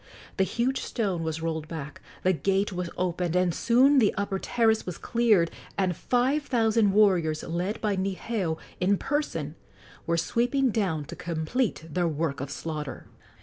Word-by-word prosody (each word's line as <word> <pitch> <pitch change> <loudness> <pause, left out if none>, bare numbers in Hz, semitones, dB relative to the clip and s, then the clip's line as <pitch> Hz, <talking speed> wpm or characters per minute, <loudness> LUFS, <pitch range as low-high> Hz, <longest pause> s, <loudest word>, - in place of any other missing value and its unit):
The 190 - +4
huge 250 +6 0
stone 195 -8 -2
was 160 0 -3
rolled 160 -2 -2
back, 150 -3 -7 0.2
the 185 - +4
gate 195 +3 0
was 180 -1 -3
opened, 180 -1 -1
and 180 -1 +2
soon 260 - +4
the 215 -5 +3
upper 200 -1 -1
terrace 225 -1 +2
was 180 - -6
cleared 220 -8 +2 0.3
and 185 -3 +1
five 255 - +1
thousand 225 -6 +2
warriors, 180 -7 +3
led 180 +6 -2
by 210 -2 +1
Niheu 190 -2 -2 0.2
in 195 +2 +3
person, 185 - -2 0.5
were 170 0 +2
sweeping 245 +8 +1
down 180 -9 -1
to - - -8
complete 170 +5 -2
their 175 +2 0
work 155 -3 -2
of 140 - -4
slaughter. 150 -1 -5
185 Hz, 155 wpm, -27 LUFS, 165-225 Hz, 0.5 s, The